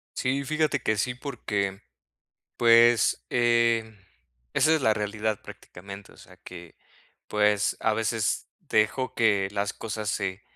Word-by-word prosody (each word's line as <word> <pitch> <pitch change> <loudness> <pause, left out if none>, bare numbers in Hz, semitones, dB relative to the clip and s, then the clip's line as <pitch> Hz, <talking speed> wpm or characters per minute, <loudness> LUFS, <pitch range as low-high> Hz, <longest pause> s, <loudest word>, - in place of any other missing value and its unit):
Sí, 135 +2 -1
fíjate 155 -1 0
que 110 - 0
sí, 125 +4 -1
porque, 105 -7 -3 0.8
pues, 115 - +4
eh, 115 -2 +2 0.6
esa 160 +1 +3
es 155 - +1
la 110 - +4
realidad 105 0 -2
prácticamente, 100 +2 -11
o - - -20
sea 90 - -16
que, 90 -3 -12 0.5
pues 105 -1 +1
a 110 -1 +1
veces 110 0 -1
dejo 115 +4 0
que 100 -4 +2
las 100 0 -2
cosas 110 -2 -4
se 100 -1 -3
110 Hz, 130 wpm, -26 LUFS, 100-120 Hz, 0.8 s, pues